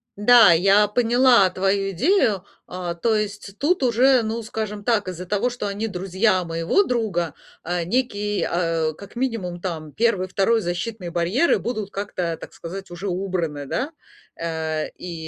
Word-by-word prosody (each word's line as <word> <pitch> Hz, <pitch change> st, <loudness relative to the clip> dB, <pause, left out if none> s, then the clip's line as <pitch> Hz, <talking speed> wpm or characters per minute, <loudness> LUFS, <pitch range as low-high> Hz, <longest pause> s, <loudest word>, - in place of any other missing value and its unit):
да, 220 Hz, -1 st, +7 dB
я 195 Hz, +5 st, +4 dB
поняла 240 Hz, -1 st, +4 dB
твою 195 Hz, +1 st, 0 dB
идею. 215 Hz, -, +2 dB, 0.2 s
Э, 180 Hz, -1 st, -5 dB
то 230 Hz, -2 st, +2 dB
есть 205 Hz, -1 st, -4 dB
тут 310 Hz, +1 st, +1 dB
уже, 250 Hz, +1 st, +4 dB
ну, 225 Hz, +1 st, -3 dB
скажем 215 Hz, -2 st, -5 dB
так, 210 Hz, -3 st, +1 dB
из-за 180 Hz, 0 st, -5 dB
того, 210 Hz, +6 st, +1 dB
что 240 Hz, -4 st, -4 dB
они 205 Hz, +3 st, -3 dB
друзья 190 Hz, 0 st, 0 dB
моего 165 Hz, -, +1 dB
друга, 205 Hz, -, -1 dB, 0.3 s
э, 175 Hz, 0 st, -2 dB
некий, 210 Hz, -1 st, -1 dB
э, 165 Hz, -2 st, 0 dB
как 200 Hz, +7 st, -13 dB
минимум 225 Hz, -9 st, -3 dB
там 160 Hz, -5 st, -5 dB
1-2 210 Hz, 0 st, +1 dB
защитный 175 Hz, +2 st, -4 dB
барьеры 180 Hz, -, +2 dB
будут 215 Hz, -5 st, -4 dB
как-то, 185 Hz, -4 st, -3 dB
так -, -, -11 dB
сказать, 190 Hz, +3 st, -8 dB
уже 175 Hz, +3 st, -6 dB
убраны, 175 Hz, -6 st, -2 dB
да? 270 Hz, -, -2 dB, 0.4 s
Э, 160 Hz, -2 st, -3 dB
и 180 Hz, -1 st, -7 dB
200 Hz, 150 wpm, -22 LUFS, 175-230 Hz, 0.4 s, да